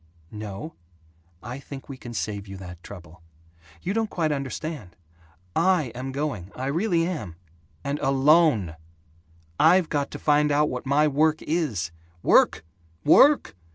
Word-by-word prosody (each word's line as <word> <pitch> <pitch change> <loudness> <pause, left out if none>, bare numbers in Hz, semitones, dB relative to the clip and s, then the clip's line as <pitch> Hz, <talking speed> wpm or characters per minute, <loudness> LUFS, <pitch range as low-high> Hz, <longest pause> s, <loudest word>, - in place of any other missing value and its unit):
"No, 105 +7 -7 0.7
I 125 +4 -6
think 140 -1 -10
we 135 - -7
can 120 -2 -9
save 100 -2 -3
you 95 0 -8
that 90 -2 -10
trouble. 85 -1 -12 0.6
You 190 - -1
don't 225 0 0
quite 160 -3 -1
understand. 140 - -5 0.6
I 170 -7 +2
am 130 +2 -5
going 130 - -4
I 130 - -4
really 165 +4 +1
am 110 - -5 0.5
and 140 +1 -2
alone! 135 - +3 0.8
I've 170 +2 +5
got 145 -2 -1
to - - -7
find 150 0 +2
out 150 +1 +2
what 125 +1 -5
my 145 +3 +3
work 155 +2 +2
is 135 - -1 0.2
" 85 0 -33
"Work? - - +4 0.4
Work? 280 - +5
140 Hz, 145 wpm, -25 LUFS, 105-155 Hz, 0.8 s, I've